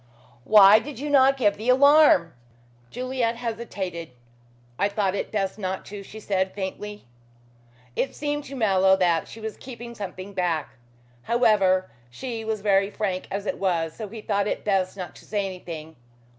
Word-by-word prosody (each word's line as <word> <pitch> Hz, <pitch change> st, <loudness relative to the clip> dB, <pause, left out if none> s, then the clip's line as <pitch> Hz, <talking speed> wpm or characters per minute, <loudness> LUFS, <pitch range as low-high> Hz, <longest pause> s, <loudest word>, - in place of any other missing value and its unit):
"Why 210 Hz, +2 st, +8 dB
did 285 Hz, +1 st, -8 dB
you 290 Hz, +3 st, -4 dB
not 275 Hz, -1 st, +5 dB
give 205 Hz, -6 st, +2 dB
the 220 Hz, +4 st, -3 dB
alarm?" 280 Hz, -, +6 dB, 0.6 s
Juliet 250 Hz, -, -2 dB
hesitated. 205 Hz, -8 st, -5 dB, 0.7 s
"I 200 Hz, -, +2 dB
thought 200 Hz, -2 st, 0 dB
it 200 Hz, -, -3 dB
best 195 Hz, -1 st, -2 dB
not 190 Hz, -1 st, -3 dB
to," 205 Hz, 0 st, -8 dB
she 215 Hz, +2 st, -11 dB
said 190 Hz, -2 st, -1 dB
faintly. 205 Hz, -1 st, -6 dB, 0.9 s
It 270 Hz, -, -1 dB
seemed 290 Hz, 0 st, -3 dB
to 275 Hz, -, -8 dB
Mallow 195 Hz, -5 st, +4 dB
that 175 Hz, -3 st, +1 dB
she 225 Hz, -, -11 dB
was 220 Hz, -1 st, -6 dB
keeping 240 Hz, -2 st, -9 dB
something 200 Hz, -2 st, -7 dB
back. 175 Hz, -4 st, -1 dB, 0.5 s
However, 195 Hz, -, +2 dB, 0.2 s
she 225 Hz, -, -6 dB
was 220 Hz, -2 st, -3 dB
very 195 Hz, -1 st, +3 dB
frank 195 Hz, -3 st, -3 dB
as 200 Hz, +1 st, -4 dB
it -, -, -3 dB
was, 170 Hz, -4 st, 0 dB
so 215 Hz, +3 st, -7 dB
he 220 Hz, +1 st, -8 dB
thought 200 Hz, -1 st, 0 dB
it -, -, -3 dB
best 195 Hz, -2 st, 0 dB
not 180 Hz, -2 st, -7 dB
to -, -, -16 dB
say 205 Hz, -2 st, -1 dB
anything. 165 Hz, -4 st, -7 dB
205 Hz, 165 wpm, -25 LUFS, 190-230 Hz, 0.9 s, Why